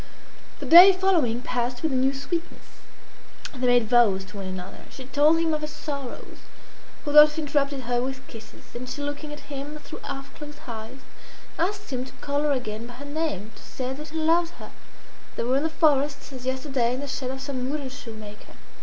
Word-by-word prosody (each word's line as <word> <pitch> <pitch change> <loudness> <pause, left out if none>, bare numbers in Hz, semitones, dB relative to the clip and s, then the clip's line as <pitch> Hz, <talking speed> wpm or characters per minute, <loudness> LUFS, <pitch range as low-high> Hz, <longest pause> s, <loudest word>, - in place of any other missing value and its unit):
The - - -6
day 360 +4 +10
following 330 -11 +2
passed 245 +1 -2
with 320 - +1
a - - 0
new 260 +1 +3
sweetness. 280 +5 -6 0.7
They 255 -2 -1
made 245 -2 +4
vows 210 -5 +4
to 190 +2 -11
one 195 -1 -5
another 185 0 -7
She 260 - -10
told 290 +4 +4
him 330 -1 +1
of 305 - -1
her 300 - -3
sorrows. 280 -4 -7 0.7
Rodolphe 300 +1 +7
interrupted 280 -2 0
her 245 0 0
with 265 +1 -4
kisses; 225 -1 -12
and 250 +1 -6
she 290 - -5
looking 290 +1 -5
at 295 - -8
him 285 +1 -7
through 300 - -10
half 275 +1 -7
closed 295 0 -10
eyes, 230 +3 -7 0.6
asked 400 -2 -1
him 250 0 -1
to 265 - -12
call 285 0 -2
her 300 -1 +1
again 230 -4 -3
by 245 - -10
her 280 +3 -9
name 285 - -3
to - - -14
say 255 0 -5
that 300 +3 -8
he 320 - -5
loved 330 +2 +2
her - - -11 0.6
They - - -2
were 255 +3 +2
in - - +1
the 320 - 0
forest, 290 -3 +1
as 255 -1 -7
yesterday, 260 -2 0
in 260 - -5
the 285 - -5
shed 260 -1 -3
of 265 +1 -4
some 260 -2 -3
woodenshoe 270 -5 -5
maker. 210 0 -11
275 Hz, 200 wpm, -25 LUFS, 245-300 Hz, 0.7 s, day